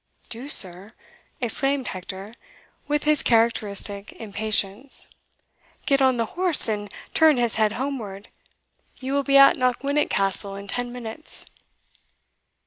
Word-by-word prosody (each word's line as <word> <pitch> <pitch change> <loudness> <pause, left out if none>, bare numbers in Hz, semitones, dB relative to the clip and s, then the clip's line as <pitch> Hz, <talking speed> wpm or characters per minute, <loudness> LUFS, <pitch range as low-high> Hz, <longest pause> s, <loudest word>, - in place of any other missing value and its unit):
"Do, 245 +5 -8
sir?" 190 -1 +1 0.5
exclaimed 270 +3 -1
Hector, 190 +3 -8 0.5
with 295 0 -1
his 300 -1 +3
characteristic 210 -3 0
impatience, 215 +3 -3 0.8
"get 275 -1 +2
on 260 -2 +3
the 230 - 0
horse, 355 -4 +6
and 205 -2 -3 0.2
turn 315 -3 +4
his 240 -2 +1
head 215 -1 +2
homeward 230 -7 -5 0.7
you 265 +1 -4
will 280 - +2
be 275 0 +3
at 275 0 +7
Knockwinnock 275 +3 0
Castle 195 0 +1
in 200 0 -9
ten 245 +4 -4
minutes." 245 +5 -8
235 Hz, 125 wpm, -23 LUFS, 205-275 Hz, 0.8 s, at